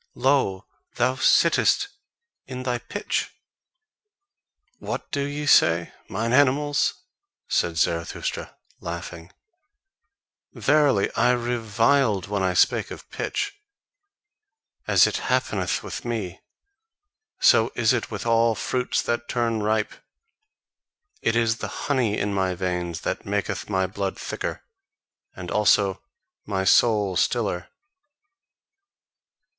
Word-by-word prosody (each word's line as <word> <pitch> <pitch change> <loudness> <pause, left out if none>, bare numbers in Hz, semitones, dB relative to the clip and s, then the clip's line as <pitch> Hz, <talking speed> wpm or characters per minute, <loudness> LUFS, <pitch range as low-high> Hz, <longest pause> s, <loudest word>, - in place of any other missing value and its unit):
Lo, 130 -8 +1 0.3
thou 125 +2 +2
sittest 265 - +3 0.6
in 130 -1 -6
thy 125 -1 -1
pitch!" 205 - -3 1.4
"What - - -5
do 140 - -1
ye 145 +1 -3
say, 85 -10 +4 0.2
mine 115 +4 -2
animals?" 145 +1 +2 0.4
said 85 -1 0
Zarathustra, 85 +1 -2 0.2
laughing; 85 0 -7 1.2
"verily 145 -9 +2
I 125 - +3
reviled 115 -2 +1
when 100 0 -2
I 95 -1 0
spake - - +3
of - - -11
pitch. 405 0 -3 1.3
As - - +6
it - - -1
happeneth - - -1
with - - -6
me, 110 -7 -4 1.0
so 110 +1 +5
is 120 0 +3
it 120 - -2
with 105 0 -6
all 115 -1 +3
fruits 125 +2 -1
that 120 0 -2
turn 115 -3 0
ripe. 110 +1 0 1.3
It 115 - +1
is 115 -1 +2
the - - -4 0.2
HONEY 125 -7 +1
in 100 0 -1
my 95 -2 0
veins 90 -2 -3
that - - -4
maketh - - -2
my 95 -2 +1
blood 95 0 -4
thicker, - - -5 0.7
and 90 -2 -7
also 100 -1 +3 0.5
my 95 -2 -1
soul 105 -2 +3
stiller." 100 -7 0
110 Hz, 110 wpm, -24 LUFS, 95-125 Hz, 1.4 s, As